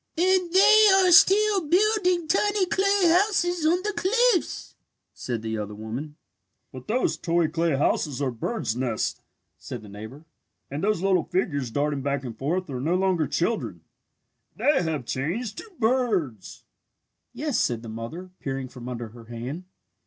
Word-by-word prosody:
"And 365 0 +2
they 430 +3 +7
are 375 -2 +4
still 395 +1 +5
building 365 -1 +2
tiny 410 +3 +2
clay 395 +2 +1
houses 350 -2 +2
on 355 +3 +2
the 420 0 -2
cliffs!" 480 +5 +1 0.4
said 120 -3 -5
the 110 -1 -3
other 105 0 -5
woman. 120 +8 -6 0.6
"But 130 -1 -11
those 245 +4 0
toy 170 -1 0
clay 165 -1 0
houses 140 0 0
are 135 -3 -1
birds' 120 - -3
nests," 125 -3 -2 0.4
said 120 -3 -8
the 105 - -12
neighbour, 110 +9 -10 0.5
"and 145 +5 -4
those 205 -3 0
little 190 -4 +2
figures 145 -9 -1
darting 145 +3 -1
back 140 0 -2
and 120 -3 -7
forth 170 +10 -2
are 125 -1 -4
no 165 +6 0
longer 185 -5 +1
children. 220 - -2 0.7
They 290 -1 +2
have 160 -7 -3
changed 200 - -3
to 450 - -11
birds!" 220 - -1 0.7
"Yes," 270 +1 -2
said 120 -1 -1
the - - -8
mother, 115 +12 -7
peering 135 -1 -4
from 125 -1 -9
under 120 -2 -6
her 115 +1 -14
hand. 125 +10 -7
170 Hz, 155 wpm, -25 LUFS, -, 0.7 s, they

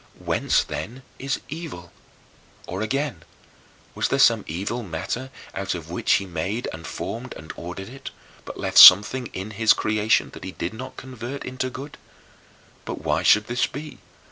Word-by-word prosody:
Whence, - - +1
then, 130 +3 -6 0.2
is 135 +1 -2
evil? 145 - -8 0.7
Or, 95 +3 -5
again, 130 - -2 0.7
was - - 0
there - - 0
some - - +5
evil 100 +9 -3
matter 110 +7 -4 0.2
out 95 -1 -2
of 85 -1 -8
which 90 - +1
he 100 - +2
made 95 +7 -3
and 80 +1 -8
formed 125 +3 -6
and 80 - -9
ordered 90 +3 -7
it, 135 +2 -9 0.3
but - - -9
left - - +3
something 110 +7 +9
in 95 +3 -7
his 110 +1 +4
creation 110 0 +1
that - - -11
he 95 0 -6
did 85 +4 -4
not 125 +4 -8
convert 130 +1 -7
into 130 0 -3
good? 135 +3 -9 0.8
But - - -6
why - - +1
should 105 0 +5
this 120 +2 0
be? 150 +2 -9
110 Hz, 165 wpm, -24 LUFS, 95-130 Hz, 0.8 s, something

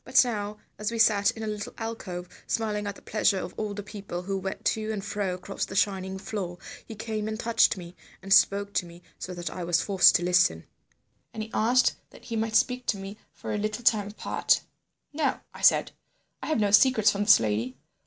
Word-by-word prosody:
But 260 0 +4
now, 210 -3 -3 0.2
as 210 +1 -2
we 230 - -3
sat 210 -3 +4
in 225 - -5
a - - -3
little 210 -1 -5
alcove, 195 -6 -5 0.2
smiling 210 -2 -1
at 200 - -4
the - - -16
pleasure 210 -2 +1
of 180 - -5
all 210 -1 -4
the 205 - -5
people 200 -4 -7
who 195 +1 -3
went 190 0 -6
to 220 0 0
and 205 -2 -4
fro 200 -3 -2
across 190 +2 -5
the 190 - -5
shining 190 -1 0
floor, 190 -3 -5 0.3
he 225 - -10
came 215 0 -4
and 220 0 -4
touched 230 -3 +3
me, 175 -1 -10 0.2
and 195 +1 0
spoke 200 0 +4
to 175 - 0
me 170 +1 -14 0.2
so 180 - -6
that 175 0 -5
I 180 - -5
was 170 -1 +1
forced 195 -2 +5
to 175 - +2
listen. 175 - +3 0.7
And 220 - -3
he 220 - -10
asked 245 +3 +3
that - - -17
he 230 - -4
might 220 0 -1
speak 250 0 +2
to 205 - +1
me 195 +1 -7 0.2
for - - -6
a 210 - -1
little 215 +3 -3
time 215 -3 +3
apart. 210 - 0 0.5
"'No,' 310 +1 0
I - - -11
said. - - +4 0.5
'I - - -5
have 310 - +1
no 205 -1 +2
secrets 215 -1 +5
from 205 0 -2
this 210 - +8
lady. 110 +4 -2
205 Hz, 220 wpm, -27 LUFS, 190-220 Hz, 0.7 s, this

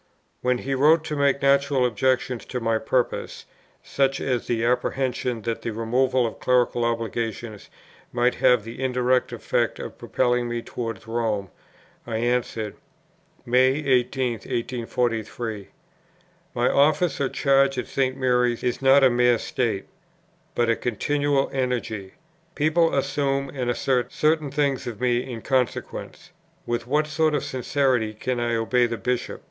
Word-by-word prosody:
When 125 0 +1
he 135 +2 -3
wrote 150 +4 +4
to 155 - -4
make 140 -1 +1
natural 140 -1 +3
objections 125 0 0
to 125 - -4
my 115 -1 0
purpose, 125 +3 -2 0.4
such 135 0 0
as 125 -3 -1
the 115 -1 0
apprehension 125 -1 -1
that 115 0 -3
the 115 - -3
removal 125 +3 +1
of 115 - -5
clerical 125 -1 +2
obligations 115 -2 -3 0.4
might 120 +1 +2
have 125 -4 +3
the 115 +4 -8
indirect 125 0 +1
effect - - -1
of - - -8
propelling 125 -1 0
me 120 0 -3
towards 115 -4 -5
Rome, 110 -4 -2 0.6
I 115 -2 -2
answered: 115 -3 -1 0.7
"May 130 +2 +4
18, 130 -1 +2 0.6
1843.... 115 -3 -2 0.9
My 120 0 +2
office 150 +1 +2
or 135 - +1
charge 135 -1 +2
at 125 - -2
St. 130 -1 -1
Mary's 125 -2 +1
is 125 +1 -1
not 135 +1 +6
a 130 - +7
mere 120 0 +4
state, 115 -4 -2 0.7
but 120 - +2
a 115 - +3
continual 140 +5 0
energy. 120 -7 -2 0.4
People 155 +2 +2
assume 140 0 0
and 125 -3 -2
assert 125 0 0
certain 155 -1 +1
things 140 -2 0
of 115 -4 -6
me 125 -1 +2
in 115 -2 -7
consequence. 130 +6 -2 0.3
With 120 0 -2
what 150 +4 +2
sort 155 0 +1
of - - -1
sincerity 130 -4 0
can 125 +3 -2
I 120 0 0
obey 120 +2 +2
the 115 0 -4
Bishop? 125 +1 -2
125 Hz, 145 wpm, -24 LUFS, 120-135 Hz, 0.9 s, a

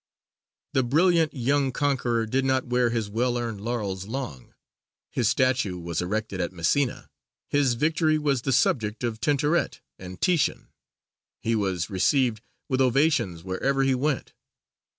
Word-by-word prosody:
The 135 - +3
brilliant 160 +5 +3
young 135 +2 +1
conqueror 125 -5 0
did 130 +4 0
not 130 -1 +1
wear 125 0 +2
his 115 -3 -1
well 120 +4 0
earned 115 -4 -4
laurels 100 -5 -3
long. 110 - -6 0.6
His 120 -4 +1
statue 125 -8 +1
was 85 -1 -3
erected 100 +1 -2
at 85 - -2
Messina; 95 - 0 0.4
his 140 -4 +2
victory 155 +3 +2
was 140 -4 0
the 135 - -1
subject 115 -3 +1
of 115 -2 -3
Tintoret 150 +5 +1 0.2
and 90 0 -9
Titian; 175 -5 +1 0.7
he 115 0 0
was 95 -5 -1
received 115 +3 +2 0.3
with 130 -1 +1
ovations 130 - +2
wherever 135 +9 0
he 135 0 +3
went. 135 +1 -1
125 Hz, 140 wpm, -26 LUFS, 105-135 Hz, 0.7 s, The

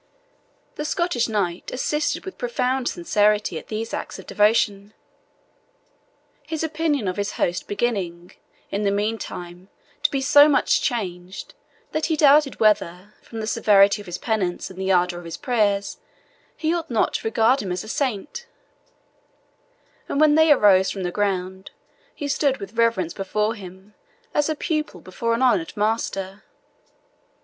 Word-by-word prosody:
The 300 - -3
Scottish 305 -7 0
knight 190 -5 -2
assisted 300 +7 -1
with 380 - -8
profound 265 - -1
sincerity 210 - +1
at - - -16
these 225 +1 -4
acts - - -5
of - - -11
devotion, 210 -1 +1 1.5
his 320 -1 -3
opinion 310 -7 -1
of 185 - -2
his 200 0 -2
host 175 +1 -1
beginning, 195 -6 -2 0.4
in 200 - -1
the 205 - +1
meantime, 200 -3 -4 0.3
to - - +3
be 275 - -1
so 285 +2 +6
much 290 - +2
changed, 185 -5 -4 0.4
that 310 - -1
he 320 - +1
doubted 290 -2 +4
whether, 205 -2 +1
from 225 -1 -8
the - - -3
severity 205 -1 +4
of 205 - -14
his 175 0 -4
penance 195 -6 -2
and 190 0 -8
the 190 0 0
ardour 180 -1 +2
of 175 - -12
his 165 - -6
prayers, 210 -6 0 0.6
he 320 0 0
ought 340 -2 -3
not 230 -3 +1
to - - -2
regard 225 +4 +3
him 190 - -4
as 180 - -3
a - - -11
saint; 280 - -3 1.6
and 280 - -1
when 305 -1 +5
they 315 0 +5
arose 195 -8 +5
from 195 - -4
the 180 - -2
ground, 190 -1 -2 0.5
he 290 - -4
stood 275 -1 +1
with 200 +1 -9
reverence 230 -7 +1
before 210 +3 -1
him, 190 0 -12 0.4
as 295 +1 +1
a 310 - 0
pupil 305 - -3
before 230 +7 -2
an 245 - -1
honoured 210 -6 +1
master. 205 -2 -2
210 Hz, 155 wpm, -23 LUFS, 190-270 Hz, 1.6 s, so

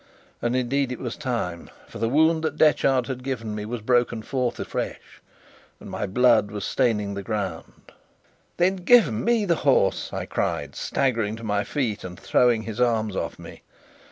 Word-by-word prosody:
And 120 +1 0
indeed 130 +1 0
it 125 - -4
was 120 -3 -5
time, 120 - -3 0.2
for - - -10
the 115 - 0
wound 160 +4 +3
that 160 - -2
Detchard 135 -4 +3
had 125 0 -5
given 115 -5 -3
me 105 0 -4
was 115 +1 -5
broken 120 -1 +1
forth 125 0 -2
afresh, - - -5 0.6
and - - -10
my 105 - -3
blood 115 0 +4
was 105 -2 -5
staining 105 -6 0
the 100 - -4
ground. 95 -5 -5 0.7
"Then 185 +2 +2
give 190 - +5
me 225 - +1
the 170 -4 +2
horse!" 130 -8 +2
I - - -4
cried, - - -2
staggering 115 -5 0
to 115 - -11
my 105 -2 0
feet 115 -2 -2
and 90 -1 -8
throwing 120 -3 +2
his 110 +2 -4
arms 110 -4 +1
off - - -3
me. - - -11
120 Hz, 175 wpm, -24 LUFS, 105-135 Hz, 0.7 s, give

